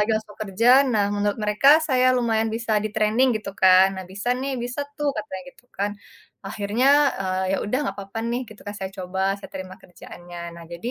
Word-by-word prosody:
lagi 210 +2 +1
langsung 215 -1 -7
kerja, 215 +4 +2
nah, 220 -7 +1
menurut 205 +1 -1
mereka, 210 +5 +2 0.2
saya 255 -4 +2
lumayan 225 -2 +1
bisa 225 0 -3
di-training, 215 +4 +2
gitu 205 -2 -7
kan. 190 0 +6
Nah, 190 - -6
"Bisa 200 +5 -5
nih, 265 +1 -3
bisa 245 +3 -4 0.2
tuh," 290 -1 0
katanya 280 -2 -5
gitu, - - -23
kan. 200 +1 -2 0.6
Akhirnya, 210 +6 -1 0.3
eee, 185 0 -1
ya - - +1
udah, 250 +6 -1
nggak 195 - -3
apa-apa 200 +3 -7
nih, 240 +2 -1
gitu 215 - -14
kan, 205 - -5
saya 190 -1 -5
coba, 190 +1 -2
saya - - -10
terima 185 0 -7
kerjaannya. 175 -1 -10
Nah, 170 - -11
jadi, 175 +8 -6
210 Hz, 200 wpm, -23 LUFS, 190-240 Hz, 0.6 s, kan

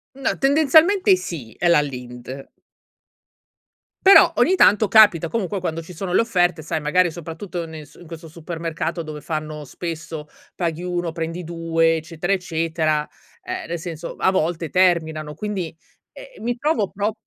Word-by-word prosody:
No 275 - -1
tendenzialmente 315 +8 +5
sì, 155 - -6
è 175 - +1
la 160 -3 +5
Lindt 125 -1 -7 1.5
Però 390 +1 +8
ogni 375 - +4
tanto 210 - +5
capita 205 -7 +6
comunque 200 -2 -2
quando 165 -2 -3
ci 180 - -11
sono 180 +1 -4
le - - +5
offerte, 175 -7 +1
sai, 160 0 -3
magari 175 +4 +2
soprattutto 170 +1 -6
nel 155 -2 -9
s - - -21
in 175 - -13
questo 165 0 -10
supermercato 165 +1 -4
dove 155 -1 -8
fanno 155 -1 -5
spesso, 160 -1 -6 0.3
paghi 170 -1 -3
1 175 -2 -2
prendi 165 +1 -4
2 165 -1 +1
eccetera, 165 +3 -3
eccetera, 160 -4 -1 0.4
ehm, - - -5
nel 170 - -3
senso 165 -1 -7
a 190 - +2
volte 165 -3 -1
terminano. 160 -4 +1
Quindi 185 -4 -4 0.4
ehm, - - -13
mi 240 +1 -1
trovo 255 -7 0
pro 205 +2 -1
170 Hz, 155 wpm, -21 LUFS, 160-190 Hz, 1.5 s, Però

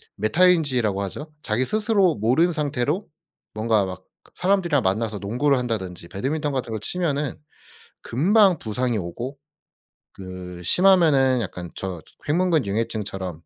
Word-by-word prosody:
메타인지라고 130 - +2
하죠. 150 - -6
자기 115 0 0
스스로 210 - +2
모른 125 +12 +2
상태로 150 - -1 0.5
뭔가 110 -2 +1
막 95 0 -8 0.3
사람들이랑 180 - +1
만나서 105 +2 -1
농구를 125 +8 +1
한다든지 95 -9 -4
배드민턴 145 - -2
같은 130 -4 -3
거 110 - -3
치면은 150 - -1 0.7
금방 190 - +3
부상이 120 0 -1
오고 115 +10 -5 0.8
그 90 -2 -9
심하면은 150 - +4
약간 90 -4 -6
저 95 -3 -5 0.3
횡문근융해증처럼 110 - -1
125 Hz, 310 characters per minute, -23 LUFS, 100-160 Hz, 0.8 s, 심하면은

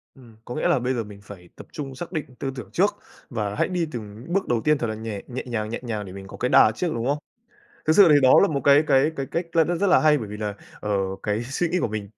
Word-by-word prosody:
Ừm, 120 -4 -16
có 120 - -6
nghĩa - - 0
là - - +3
bây 125 +2 -1
giờ 115 - -2
mình 105 -1 -12
phải 90 -4 -12
tập - - -12
trung 135 -3 -6
xác 175 +6 -7
định 155 -4 -3
tư 135 - -3
tưởng 110 -7 -8
trước 195 - +2 0.3
và 105 -4 -3
hãy - - +1
đi 175 -3 -1
từng 110 -1 -8
bước 195 -1 +1
đầu 120 -2 +1
tiên 150 0 +3
thật 120 - -2
là 110 - -3
nhè 110 -2 -5
nhẹ 130 0 -5
nhàng, 110 -3 -3
nhẹ 115 - -4
nhàng 110 -4 -4
để 95 - -9
mình 95 0 -9
có - - -10
cái 125 - -1
đà 110 - +6
trước, 180 - -1
đúng 115 0 -3
không? 145 - +1 0.7
Thực 155 - +5
sự 200 -4 +8
thì - - +7
đó 130 - +6
là 200 - +4
một 140 -3 -1
cái 145 +2 +6
cái 135 +2 +4
cái 135 - -3
cách 170 +1 -1
là 165 - +6
rất 175 +4 0
là 185 - +5
hay 150 -1 +4
bởi 110 - -6
vì 105 - -6
là, 105 -1 -3 0.3
ờ, 105 - -4 0.3
cái 105 +1 -1
suy 145 +7 -1
nghĩ 180 - 0
của - - 0
mình 105 -2 -5
125 Hz, 295 wpm, -24 LUFS, 105-150 Hz, 0.7 s, sự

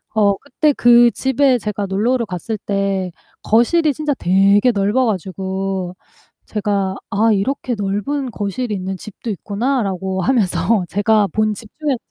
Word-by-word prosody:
어 200 -2 +3
그때 285 +2 0
그 240 -1 +6
집에 265 -1 +2
제가 205 -1 -3
놀러를 230 +5 0
갔을 200 +5 -4
때 195 -3 -1 0.3
거실이 290 +8 +3
진짜 300 -2 -1
되게 200 +5 +3
넓어 210 +5 +1
가지고 190 -1 -3 0.5
제가 200 -2 -1 0.2
'아 220 +3 +3
이렇게 250 +5 -1
넓은 210 +8 -2
거실이 210 +3 -3
있는 190 0 -4
집도 215 +3 -9
있구나.'라고 200 -3 -2
하면서 220 -3 +1
제가 205 +2 +2
본 215 0 +1
집 215 +1 -11
중에서 290 -5 0
210 Hz, 280 characters per minute, -18 LUFS, 195-245 Hz, 0.5 s, 그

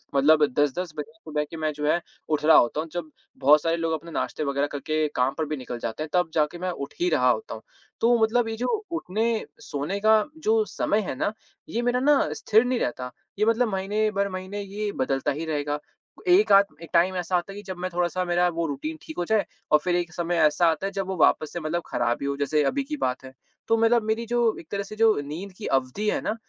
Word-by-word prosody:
मतलब 150 +2 +5
10-10 150 +5 0
बजे 150 +9 -5
सुबह 155 -9 -3
के 165 - -6
मैं 155 -1 -1
जो 150 0 -4
है 170 +3 +2 0.3
उठ 150 -1 0
रहा 160 - +7
होता 120 +5 +3
हूँ 165 - -7
जब 170 -3 -4 0.3
बहुत 150 +2 +6
सारे 165 0 +1
लोग 165 -1 -1
अपने 165 +2 -5
नाश्ते 155 - -2
वग़ैरह 140 0 0
करके 155 +2 -1
काम 125 +1 +2
पर 160 - 0
भी 155 - -2
निकल 125 -2 -6
जाते 115 +7 -4
हैं 155 - -7
तब 180 -2 +2
जाके 155 +1 +1
मैं 185 - -2
उठ 140 -5 -6
ही 355 +1 +2
रहा - - +3
होता 450 +1 -1
हूँ। - - -10 0.4
तो 235 +1 +5
मतलब 230 +1 +2
ये 225 - -3
जो 250 +2 -1 0.2
उठने 225 - -1 0.2
सोने 165 +4 -3
का 215 0 +5 0.2
जो 220 0 +3
समय 210 - 0
है - - -3
ना, 205 +10 -1 0.4
ये 235 - -1
मेरा 245 +1 +1
ना 290 +2 +4
स्थिर 220 +3 +3
नहीं 250 -1 0
रहता। 125 +1 -3 0.3
ये 215 - +4
मतलब 230 +2 +3
महीने 205 +3 0
भर 200 0 0
महीने 185 +2 -5
ये 205 +1 -4
बदलता 135 +1 0
ही 155 +4 -4
रहेगा। 145 -1 -2 0.5
एक-आध 200 +2 +6 0.2
एक 165 - -10
टाइम 180 +2 +3
ऐसा 180 0 0
आता 175 +3 -4
है - - -11
कि 205 - -8
जब 185 -2 -7
मैं 185 +1 -3
थोड़ा-सा 175 +1 0
मेरा 175 0 +2
वो 170 0 -2
रूटीन 150 +3 -4
ठीक 160 - -10
हो 175 - -1
जाए 215 +1 +2 0.3
और 150 - +6
फ़िर 175 +3 0
एक 175 -1 -1
समय 175 0 -1
ऐसा 155 +3 +3
आता 160 +3 +1
है 195 - -2
जब 195 -1 -3
वो 190 - -2
वापस 155 -1 +3
मतलब 165 +3 -1
ख़राब 120 0 0
ही - - -2
हो 140 - -1
जैसे 150 +1 +1
अभी 275 - 0
की 300 +2 -5
बात 125 - -2
है। 130 - -11 0.3
तो 225 - +3
मतलब 230 +1 +3
मेरी 220 +2 -1
जो 240 +1 0 0.2
एक 160 - -13
तरह 200 0 -1
से 215 - -9
जो 220 0 +4
नींद 160 +8 -7
की 220 - -7
अवधि 135 +11 0
है - - 0
ना, 215 - -2
175 Hz, 245 wpm, -25 LUFS, 150-215 Hz, 0.5 s, रहा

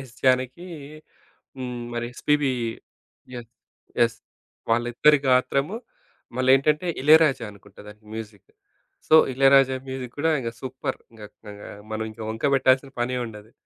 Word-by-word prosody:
Yes 130 -2 -12
Janaki 130 +6 +1 0.9
హ్మ్. 125 -2 -5
మరి 120 0 -3
SPB 145 +1 +1 0.8
yes. 120 -2 -8 0.5
Yes. 115 -1 +2 0.5
వాళ్ళిద్దరి 120 +6 +3
గాత్రము 135 +7 +2 0.6
మళ్ళీ 130 0 +1
ఏంటంటే 150 +5 +1
ఇళయరాజా 150 -4 +5
అనుకుంట 100 0 -19
దానికి 105 +1 -14
మ్యూజిక్. 105 -3 -9 0.6
సో 155 - +6 0.2
ఇళయరాజా 135 0 +5
మ్యూజిక్ 130 -2 -6
గూడా 160 +2 +1
ఇంగ 120 -3 -3
సూప్పర్! 130 +1 -4
ఇంగా 110 -2 -11 0.2
కగా 105 0 -10 0.2
మనం 110 0 -2
ఇంక 110 - -19
వంక 110 +3 -6
పెట్టాల్సిన 135 0 +3
పనే 125 +1 -1
ఉండదు. 110 0 -11
130 Hz, 125 wpm, -24 LUFS, 115-135 Hz, 0.9 s, సో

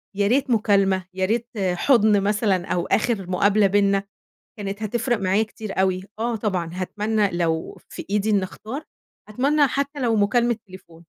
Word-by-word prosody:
يا 200 0 +1
ريت 265 +4 +1
مُكالمة، 195 -5 +2
يا 190 0 0
ريت 230 +4 -1 0.3
حُضن 215 -1 +3
مثلًا، 205 -3 +1
أو 175 -2 -1
آخر 210 -5 0
مقابلة 200 +2 +3
بيننا 200 0 +2 0.6
كانت 200 +1 -5
هتفرِق 235 +2 -1
معايا 195 +2 +2
كتير 215 -3 -5
أوي 185 -1 +1 0.2
آه 235 0 -1
طبعًا 185 -6 -2
هاتمنى 210 +2 -1
لو 165 -2 -2
في - - -8
إيدي 210 +1 +1
إني 200 -2 +2
اختار، 250 +10 -7 0.4
أتمنى 280 +6 +2
حتى 280 +2 -3
لو 230 -3 +1
مُكالمة 235 +3 +2
تليفون. 170 -3 -15
205 Hz, 155 wpm, -23 LUFS, 190-230 Hz, 0.6 s, حُضن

